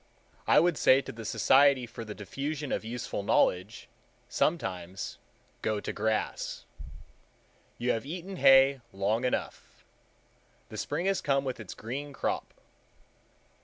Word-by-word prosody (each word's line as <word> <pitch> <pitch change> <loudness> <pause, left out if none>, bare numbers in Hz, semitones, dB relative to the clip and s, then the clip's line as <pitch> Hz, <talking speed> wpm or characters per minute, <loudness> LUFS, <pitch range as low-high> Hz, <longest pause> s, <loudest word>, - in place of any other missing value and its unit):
I - - +6
would 170 -2 +2
say 130 - +6
to - - -7
the 115 0 -9
Society 135 +2 +4
for 115 0 -8
the 105 -2 -7
Diffusion 140 +7 -4
of - - -1
Useful 115 -2 -4
Knowledge, 100 +1 +1 0.4
sometimes,—Go 95 - -3
to - - -5
grass. 110 +1 -2 1.1
You 125 +1 0
have 115 - -1
eaten 180 +6 -6
hay 135 -1 +6
long 105 +5 0
enough. 125 - -4 0.8
The - - -8
spring 175 - -2
has 195 0 +1
come 140 -1 +1
with 130 -3 -4
its 110 -4 -8
green 140 +6 -6
crop. - - -2
125 Hz, 130 wpm, -29 LUFS, 110-140 Hz, 1.1 s, I